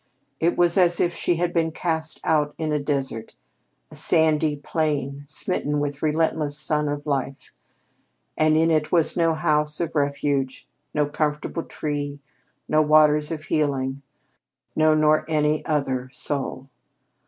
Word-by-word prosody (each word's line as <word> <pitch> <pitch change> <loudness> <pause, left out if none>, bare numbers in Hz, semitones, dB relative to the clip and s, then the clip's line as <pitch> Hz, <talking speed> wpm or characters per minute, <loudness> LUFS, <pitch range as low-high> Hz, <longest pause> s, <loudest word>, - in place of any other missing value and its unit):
It 170 +2 +1
was 175 +1 +3
as 175 -1 +3
if 175 - +1
she 175 - 0
had 175 +1 -1
been 165 -1 +1
cast 160 -1 -3
out 150 -2 +1
into 155 -2 -1
a - - -2
desert 135 -6 -3 0.6
a - - -11
sandy 155 -1 +2
plain 145 -2 -2
smitten 150 -1 -1
with 145 -1 -3
the 155 - 0
relentless 155 -1 0
Sun 150 0 0
of 145 0 -4
Life, 135 -2 -3 0.8
and 155 0 +3
in 165 +1 +3
it 155 -1 +1
was 170 -3 +2
no 165 -2 +2
house 150 -1 0
of 170 -2 -2
refuge, 140 -2 -1 0.3
no 150 -1 +3
comfortable 150 +2 -2
tree, 145 -2 -4 0.5
no 155 0 +3
waters 150 0 +4
of 155 -2 -4
healing. 140 -3 -1 0.7
No, 155 0 +4
nor 155 0 +3
any 150 -1 +1
other 135 -5 -1
soul. 135 -1 -4
150 Hz, 145 wpm, -24 LUFS, 145-160 Hz, 0.8 s, waters